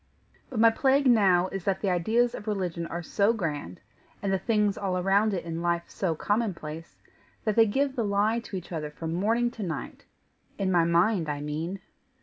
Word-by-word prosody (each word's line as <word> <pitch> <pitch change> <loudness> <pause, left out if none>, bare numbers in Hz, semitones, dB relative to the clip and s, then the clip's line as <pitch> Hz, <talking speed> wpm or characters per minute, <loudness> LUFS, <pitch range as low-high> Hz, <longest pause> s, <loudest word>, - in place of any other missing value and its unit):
But 250 - -4
my 225 0 +7
plague 270 +4 +2
now 195 -7 +4
is 195 -2 -5
that 195 -1 0
the 195 - +1
ideas 225 +7 +2
of 210 - -8
religion 180 -5 -2
are 170 +1 -5
so 200 +6 +2
grand, 150 - -4 0.4
and 195 -1 0
the 190 - +1
things 210 -1 +1
all 190 -2 -2
around 195 +4 +2
it 180 -4 -3
in 165 0 -4
life 170 0 0
so 175 -5 -1
common 205 +3 0
place, 160 +1 -9 0.5
that 215 -2 0
they 225 -1 +6
give 270 +5 0
the 235 - 0
lie 205 +3 +1
to 215 -4 -6
each 180 - -9
other 155 -3 -3
from 160 +2 -5
morning 230 +7 +1
to 230 - -9
night 165 -6 -5 0.5
in 190 -1 0
my 170 -2 +4
mind, 170 0 +2
I 145 -1 -2
mean. 160 +6 -4
195 Hz, 200 wpm, -27 LUFS, 170-220 Hz, 0.5 s, my